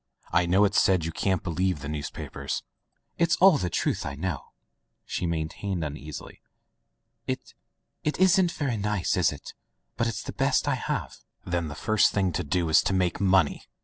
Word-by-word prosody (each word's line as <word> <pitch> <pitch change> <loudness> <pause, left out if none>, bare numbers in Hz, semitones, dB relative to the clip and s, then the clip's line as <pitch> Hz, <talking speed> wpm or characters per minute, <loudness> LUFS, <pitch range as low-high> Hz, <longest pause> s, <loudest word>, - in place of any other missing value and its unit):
I 85 0 +3
know 95 +4 +5
it's 100 - +3
said 95 -4 +3
you 80 - -2
can't 95 +2 0
believe 90 -2 -1
the 70 - -5
newspapers." 75 -1 -4 0.6
"It's 170 0 +3
all 185 -5 +6
the 90 - -1
truth - - -1
I 70 - -4
know," 80 -1 -3 0.6
she 90 - -2
maintained 85 +3 -2
uneasily. 75 0 -7 0.9
"It - - -4 0.3
— - - -52
it 150 - -1
isn't 185 -1 +5
very 135 -8 -2
nice, 105 -3 0
is 90 -3 +3
it? 75 - -9 0.4
But 115 - +1
it's 115 - -3
the - - -6
best - - +1
I - - +3
have." - - -3 0.3
"Then 85 -2 -1
the 75 - -6
first 110 +7 +3
thing 95 -2 +1
to - - -2
do 85 +3 0
is 80 - +5
to - - +1
make 90 -1 0
money!" 95 -5 +2
90 Hz, 180 wpm, -27 LUFS, 80-105 Hz, 0.9 s, all